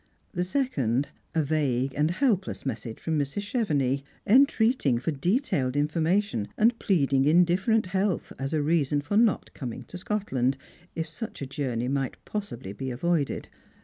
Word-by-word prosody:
Th( 180 Hz, -1 st, -1 dB
second, 145 Hz, -, 0 dB, 0.3 s
a 160 Hz, -, +3 dB
vague 135 Hz, -3 st, 0 dB
and 150 Hz, +2 st, +2 dB
helpless 195 Hz, -, 0 dB
message 115 Hz, -3 st, -4 dB
from 160 Hz, -2 st, -1 dB
]\Irs. 140 Hz, +6 st, -1 dB
Chevenix, 150 Hz, -, 0 dB, 0.2 s
entreating 230 Hz, -, +4 dB
for 130 Hz, +7 st, -1 dB
detailed 145 Hz, -, 0 dB
information, 155 Hz, -, +1 dB
and 230 Hz, +2 st, +3 dB
pleading 140 Hz, -7 st, +2 dB
indifferent 180 Hz, +7 st, +3 dB
health 190 Hz, -1 st, -1 dB
as 135 Hz, +1 st, -2 dB
a 155 Hz, -2 st, +1 dB
reason 150 Hz, -2 st, +2 dB
for 145 Hz, +8 st, -3 dB
not 225 Hz, -1 st, +2 dB
coming 125 Hz, -1 st, -6 dB
to 180 Hz, +9 st, -9 dB
Scotland, 135 Hz, -11 st, 0 dB, 0.4 s
if 165 Hz, -1 st, -2 dB
such 190 Hz, -1 st, -6 dB
a -, -, -2 dB
journey 130 Hz, -3 st, -2 dB
might 135 Hz, 0 st, -1 dB
possibly 160 Hz, -, -5 dB
be 130 Hz, +5 st, -5 dB
avoided. 145 Hz, +3 st, -1 dB
155 Hz, 145 wpm, -27 LUFS, 135-200 Hz, 0.4 s, entreating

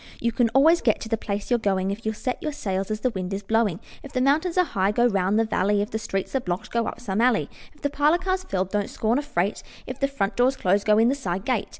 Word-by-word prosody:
You 235 Hz, -, 0 dB
can 235 Hz, 0 st, +2 dB
always 320 Hz, +5 st, +5 dB
get 220 Hz, -, +2 dB
to 220 Hz, -, -6 dB
the 225 Hz, -, +2 dB
place 205 Hz, 0 st, -5 dB
you're 240 Hz, -, +3 dB
going, 195 Hz, -3 st, 0 dB
If 210 Hz, +3 st, -6 dB
you'll 220 Hz, -, -1 dB
set 250 Hz, +4 st, -3 dB
your 305 Hz, -1 st, -3 dB
sails 195 Hz, -7 st, -3 dB
as 215 Hz, 0 st, -3 dB
the 255 Hz, -, +1 dB
wind 190 Hz, -1 st, -4 dB
is 200 Hz, -, -6 dB
blowing. 215 Hz, -4 st, +1 dB, 0.2 s
If 280 Hz, -, -11 dB
the 255 Hz, -, 0 dB
mountains 310 Hz, +7 st, +2 dB
are 365 Hz, -, +5 dB
high, 195 Hz, -, 0 dB
go 240 Hz, +3 st, +2 dB
round 195 Hz, -3 st, +2 dB
the 225 Hz, -, +3 dB
valley; 205 Hz, -1 st, +1 dB
If 205 Hz, +2 st, -2 dB
the 220 Hz, -, -2 dB
streets 195 Hz, +1 st, -3 dB
are -, -, +3 dB
blocked, 180 Hz, -6 st, -4 dB
go 235 Hz, -1 st, 0 dB
up -, -, -5 dB
some 200 Hz, -1 st, -2 dB
alley; 240 Hz, -3 st, +2 dB, 0.2 s
If 300 Hz, -, -25 dB
the 285 Hz, -, 0 dB
parlor 295 Hz, +3 st, +3 dB
car's 370 Hz, +1 st, -1 dB
filled, 190 Hz, -, -2 dB
don't 205 Hz, -1 st, -1 dB
scorn 225 Hz, +4 st, 0 dB
a -, -, -1 dB
freight; 195 Hz, -8 st, -1 dB, 0.2 s
If 255 Hz, +1 st, -7 dB
the 275 Hz, -, +2 dB
front 220 Hz, -7 st, -2 dB
door's 255 Hz, +2 st, +2 dB
closed, 200 Hz, +3 st, +1 dB
go 210 Hz, 0 st, +5 dB
in 225 Hz, +2 st, +5 dB
the -, -, +2 dB
side 190 Hz, -8 st, -3 dB
gate. 245 Hz, -6 st, 0 dB
220 Hz, 285 wpm, -24 LUFS, 200-265 Hz, 0.2 s, always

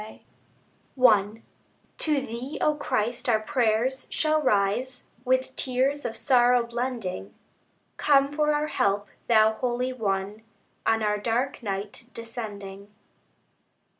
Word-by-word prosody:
) 220 Hz, +4 st, -18 dB
I 215 Hz, -2 st, +4 dB, 0.6 s
To 300 Hz, -3 st, +1 dB
Thee, 255 Hz, +4 st, -6 dB
O 305 Hz, -, +3 dB
Christ, 245 Hz, -3 st, -2 dB
our 220 Hz, -2 st, +4 dB
prayers 235 Hz, +3 st, 0 dB
shall 310 Hz, -1 st, +1 dB
rise, 250 Hz, +1 st, 0 dB, 0.2 s
With 260 Hz, 0 st, 0 dB
tears 265 Hz, +3 st, 0 dB
of 225 Hz, -, -3 dB
sorrow 245 Hz, -2 st, +4 dB
blending; 235 Hz, -, -4 dB, 0.6 s
Come 275 Hz, -2 st, +4 dB
for 300 Hz, +1 st, +1 dB
our 295 Hz, 0 st, +1 dB
help 200 Hz, -7 st, 0 dB, 0.2 s
Thou 220 Hz, -2 st, +5 dB
Holy 250 Hz, +2 st, -2 dB
One, 205 Hz, -2 st, -2 dB, 0.5 s
On 225 Hz, -1 st, +2 dB
our 210 Hz, 0 st, +1 dB
dark 240 Hz, +6 st, -1 dB
night 205 Hz, +2 st, -5 dB
descending. 205 Hz, -4 st, -7 dB
235 Hz, 115 wpm, -26 LUFS, 210-260 Hz, 0.6 s, Thou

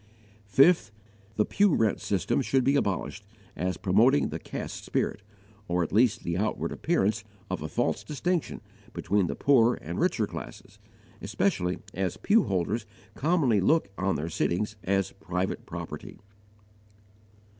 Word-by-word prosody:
5. 135 Hz, -, +4 dB, 0.4 s
The 105 Hz, -, +2 dB
pew 200 Hz, -4 st, +3 dB
rent 110 Hz, -3 st, +1 dB
system 95 Hz, +2 st, 0 dB
should 135 Hz, 0 st, +1 dB
be 140 Hz, +2 st, +3 dB
abolished, 105 Hz, -3 st, -1 dB, 0.3 s
as 90 Hz, +1 st, -2 dB
promoting 115 Hz, +9 st, +3 dB
the -, -, -5 dB
caste -, -, -6 dB
spirit, -, -, -1 dB, 0.5 s
or 90 Hz, 0 st, +1 dB
at 80 Hz, -, -5 dB
least 110 Hz, 0 st, +3 dB
the 85 Hz, +1 st, -2 dB
outward 105 Hz, +1 st, -1 dB
appearance 110 Hz, +2 st, 0 dB, 0.3 s
of 95 Hz, -, -2 dB
a 80 Hz, -, -3 dB
false 120 Hz, +9 st, -1 dB
distinction 165 Hz, +3 st, -2 dB, 0.3 s
between 100 Hz, -2 st, +1 dB
the -, -, -3 dB
poorer 125 Hz, -4 st, +4 dB
and 85 Hz, +3 st, -6 dB
richer -, -, +1 dB
classes, -, -, -9 dB, 0.4 s
especially 90 Hz, +1 st, 0 dB, 0.2 s
as 95 Hz, 0 st, -2 dB
pew 215 Hz, 0 st, +3 dB
holders 100 Hz, +5 st, -1 dB, 0.3 s
commonly 140 Hz, -, +2 dB
look 155 Hz, -, +2 dB
on 95 Hz, +1 st, 0 dB
their 75 Hz, +3 st, -3 dB
sittings 100 Hz, +6 st, -1 dB
as 95 Hz, 0 st, 0 dB
private 90 Hz, +3 st, -3 dB
property. -, -, -7 dB
105 Hz, 140 wpm, -28 LUFS, 90-135 Hz, 0.5 s, 5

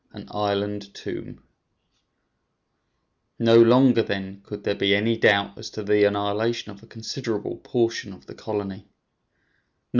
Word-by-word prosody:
AN -, -, -12 dB
ISLAND 100 Hz, 0 st, -3 dB
TOMB -, -, -9 dB, 1.9 s
No 115 Hz, 0 st, +4 dB
longer, 125 Hz, 0 st, +6 dB
then, 100 Hz, -2 st, -5 dB
could 105 Hz, 0 st, -9 dB
there -, -, 0 dB
be 100 Hz, 0 st, +2 dB
any 110 Hz, +3 st, +1 dB
doubt 100 Hz, -2 st, +3 dB
as 110 Hz, -, -8 dB
to 110 Hz, -, -7 dB
the 105 Hz, 0 st, +3 dB
annihilation 105 Hz, +3 st, -1 dB
of 100 Hz, -, -15 dB
a 115 Hz, -, -18 dB
considerable 115 Hz, -1 st, -5 dB
portion 115 Hz, -4 st, -2 dB
of 95 Hz, -, -15 dB
the -, -, -12 dB
colony. 100 Hz, -2 st, -6 dB
105 Hz, 130 wpm, -24 LUFS, 100-115 Hz, 1.9 s, longer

